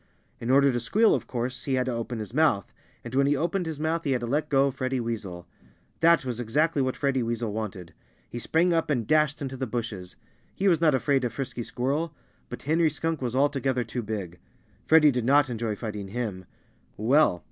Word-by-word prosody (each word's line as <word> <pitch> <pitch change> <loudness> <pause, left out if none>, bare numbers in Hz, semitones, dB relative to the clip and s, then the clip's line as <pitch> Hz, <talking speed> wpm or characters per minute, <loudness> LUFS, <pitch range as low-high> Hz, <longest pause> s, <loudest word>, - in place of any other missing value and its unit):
In 115 - -5
order 140 +1 +5
to 120 - -1
squeal, 215 - +3
of - - -2
course 125 0 -4
he 135 - 0
had 130 -1 +1
to 130 - -2
open 115 +1 -4
his 110 +1 -6
mouth. 145 - +2 0.3
And 120 - -8
when 140 +1 +3
he 145 - +3
opened 175 +4 -1
his 155 -3 -5
mouth 160 +2 -1
he 140 - +1
had 125 - -1
to - - -2
let 150 +5 -1
go 135 -1 +4
of 140 - -1
Freddie 130 -1 -2
Weasel. 105 -7 -5 0.5
That 165 -3 +4
was 125 -2 -3
exactly 145 +6 +1
what 130 -1 -1
Freddie 135 -2 0
Weasel 115 -2 -2
wanted. 95 -6 -5 0.3
He 120 - -6
sprang 170 +8 +2
up 165 -1 0
and 125 -6 0
dashed 150 +1 +2
into 135 -1 -5
the 130 0 -3
bushes. 110 -6 -5 0.4
He 200 - 0
was 170 -4 +3
not 155 -4 +4
afraid 135 0 +1
of 120 -2 -2
Frisky 125 -1 -4
Squirrel. 145 +7 -2 0.3
But 125 - -8
Henry 160 +3 +2
Skunk 160 0 -3
was 125 -1 -2
altogether 135 -2 +1
too 120 +2 -4
big. 100 -6 -5 0.5
Freddie 155 -2 +6
did 125 -2 -1
not 140 +1 +4
enjoy 115 -2 -2
fighting 105 -3 -5
him. 100 -4 -4 0.5
Well! 120 - +3
130 Hz, 210 wpm, -26 LUFS, 115-150 Hz, 0.5 s, Freddie